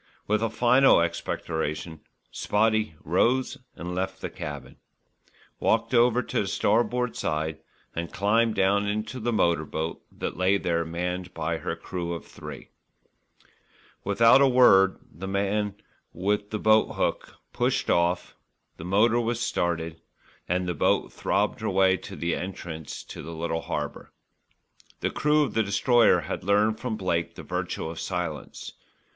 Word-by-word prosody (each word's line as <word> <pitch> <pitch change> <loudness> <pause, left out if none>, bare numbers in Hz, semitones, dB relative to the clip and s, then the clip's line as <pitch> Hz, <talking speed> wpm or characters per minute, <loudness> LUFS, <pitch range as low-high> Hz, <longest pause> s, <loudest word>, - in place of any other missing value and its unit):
With 105 +1 +1
a 115 - +1
final 125 +2 +5
expectoration, 80 -1 -3 0.3
"Spotty" 110 -3 +1
rose 130 - +1 0.2
and 90 +1 -6
left 95 +1 -3
the - - -5
cabin, 75 -7 -7 0.8
walked 115 +2 +1
over 120 +1 +4
to - - -1
the 100 - -3
starboard 120 +5 +1
side 80 0 -2 0.4
and 85 +1 -4
climbed 110 +3 +2
down 100 +2 +2
into 110 +4 -3
the 120 +1 -1
motor 85 -7 +2
boat 80 +2 -4
that - - -5
lay 95 +3 +3
there 85 -3 0
manned 90 +2 -4
by 80 +1 -2
her - - -3
crew 85 -2 -5
of 85 - -8
three - - -10 0.7
men. - - -29 0.5
Without 115 +6 +5
a 140 - +6
word 95 -7 +6 0.2
the 95 +5 -7
man 100 +1 -1 0.4
with 100 +3 -1
the 105 - -2
boat 110 +1 +3
hook - - -2 0.2
pushed - - 0
off, 85 +1 +1 0.4
the - - -8
motor 105 +6 +3
was 120 0 -1
started 85 -7 -2 0.5
and 90 +1 0
the 90 - 0
boat 75 - +1
throbbed - - 0
her - - -2
way 95 0 +4
to - - -9
the 85 0 -1
entrance 85 -4 -6
to - - -9
the 80 +2 -8
little 80 0 -2
harbour. - - -5 0.9
The - - 0
crew 150 0 +3
of 130 - -3
the 110 - +2
Destroyer 110 -1 +4
had 85 +2 -5
learned 105 +3 +2
from 120 -4 -3
Blake 85 -4 -1
the - - -9
virtue - - -3
of 80 0 -6
silence. 80 -5 -4
95 Hz, 150 wpm, -26 LUFS, 85-110 Hz, 0.9 s, a